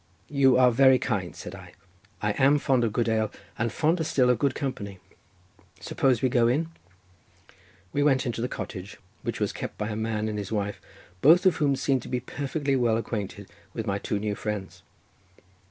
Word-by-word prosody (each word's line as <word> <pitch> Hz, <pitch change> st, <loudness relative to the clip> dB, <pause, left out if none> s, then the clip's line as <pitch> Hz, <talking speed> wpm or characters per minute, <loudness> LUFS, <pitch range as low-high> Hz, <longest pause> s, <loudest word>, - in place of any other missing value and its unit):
"You 135 Hz, -3 st, +4 dB
are 125 Hz, -1 st, +6 dB
very 130 Hz, +2 st, +6 dB
kind," 100 Hz, -9 st, -2 dB
said 90 Hz, -, -8 dB
I, 90 Hz, -3 st, -11 dB, 0.5 s
"I 105 Hz, -, +2 dB
am 135 Hz, +6 st, +4 dB
fond 130 Hz, -3 st, +2 dB
of 115 Hz, -, +1 dB
good 115 Hz, +1 st, 0 dB
ale, 110 Hz, -1 st, +1 dB, 0.3 s
and 115 Hz, 0 st, 0 dB
fonder 160 Hz, -, +1 dB
still 130 Hz, -5 st, +3 dB
of 120 Hz, -, 0 dB
good 140 Hz, 0 st, +1 dB
company—suppose 100 Hz, +1 st, -4 dB
we -, -, +5 dB
go 120 Hz, -2 st, +3 dB
in?" 150 Hz, +7 st, +1 dB, 1.2 s
We 145 Hz, -, +1 dB
went 135 Hz, -3 st, +3 dB
into 120 Hz, -1 st, -2 dB
the 125 Hz, -, 0 dB
cottage, 95 Hz, -5 st, -7 dB, 0.2 s
which -, -, -4 dB
was -, -, -1 dB
kept -, -, -6 dB
by 105 Hz, -, -3 dB
a 105 Hz, -, -3 dB
man 110 Hz, 0 st, -2 dB
and 105 Hz, -1 st, -3 dB
his 100 Hz, 0 st, -6 dB
wife, 105 Hz, -1 st, -2 dB, 0.4 s
both 165 Hz, +6 st, +6 dB
of 185 Hz, -, +4 dB
whom 140 Hz, -3 st, +2 dB
seemed 130 Hz, 0 st, +1 dB
to -, -, -10 dB
be 125 Hz, -, -1 dB
perfectly 140 Hz, +2 st, -2 dB
well 120 Hz, -3 st, +2 dB
acquainted 100 Hz, -3 st, -4 dB, 0.3 s
with 115 Hz, -, -3 dB
my 100 Hz, -2 st, -1 dB
two 105 Hz, -, -2 dB
new 105 Hz, 0 st, -2 dB
friends. 105 Hz, -2 st, -5 dB
115 Hz, 185 wpm, -26 LUFS, 105-135 Hz, 1.2 s, are